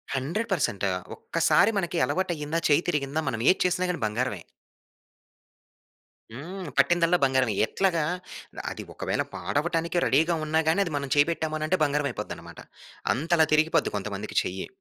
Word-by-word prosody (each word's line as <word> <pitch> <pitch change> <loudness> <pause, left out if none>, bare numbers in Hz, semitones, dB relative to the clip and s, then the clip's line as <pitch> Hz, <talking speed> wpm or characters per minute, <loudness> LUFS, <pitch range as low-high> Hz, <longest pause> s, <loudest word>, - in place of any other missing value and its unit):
100% 160 - -1 0.3
ఒక్కసారి 215 - +2
మనకి 175 -3 -1
అలవాటయ్యిందా! 165 -3 -2
చేయ్యి 150 +3 +3
తిరిగిందా! 150 -1 -1
మనమేది 125 +10 +3
చేసినా 180 0 +1
గాని 180 - -3
బంగారమే. 105 -2 -2 1.9
హ్మ్. 175 +9 -7
పట్టిందల్లా 170 +4 +4
బంగారమే. 130 -4 +2
ఎట్లాగా? 180 -5 +1 0.6
ఆహ్, - - -3
అది - - -7
ఒకవేళ - - -2
పాడవటానికి 165 +3 -1
రెడీగా 160 +5 +3
ఉన్నా 160 +1 +1
గాని, 165 +5 +3
అది 165 - -5
మనం 140 -1 -4
చేయి 145 +1 +5
పెట్టాము 160 -1 -2
అని 155 - -2
అంటే 185 +3 +1
బంగారం 145 0 +1
అయిపోద్దనమాట. - - -8 0.5
అంతలా 160 +4 +2
తిరిగిపోద్ది 155 +1 +2
కొంతమందికి - - -4
చెయ్యి. - - -5
160 Hz, 135 wpm, -26 LUFS, 140-175 Hz, 1.9 s, చేయి